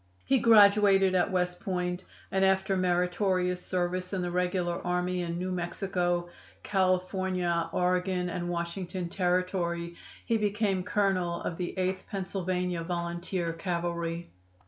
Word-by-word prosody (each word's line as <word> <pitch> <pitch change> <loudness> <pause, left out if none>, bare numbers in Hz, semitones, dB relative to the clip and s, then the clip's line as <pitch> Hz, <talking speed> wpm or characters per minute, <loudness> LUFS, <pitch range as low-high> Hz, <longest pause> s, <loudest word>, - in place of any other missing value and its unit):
He 265 -1 +3
graduated 200 -4 +6
at 180 -1 +2
West 180 -1 0
Point, 180 -1 -2 0.3
and 190 0 +2
after 190 0 +2
meritorious 180 0 +1
service 180 +1 -2
in 185 -2 -1
the 175 - -2
regular 180 -1 0
army 180 0 0
in 170 -1 -3
New 185 +1 -2
Mexico, 175 0 -1 0.4
California, 185 -2 0
Oregon 180 0 +1
and 175 0 -3
Washington 175 +1 -3
Territory 175 -2 -1 0.3
he 230 - +2
became 205 -2 +1
colonel 185 -3 0
of 165 - -3
the 180 +1 -4
Eighth 185 0 -1
Pennsylvania 180 -2 -2
Volunteer 170 0 -3
Cavalry. 170 -1 -3
180 Hz, 125 wpm, -29 LUFS, 175-190 Hz, 0.4 s, graduated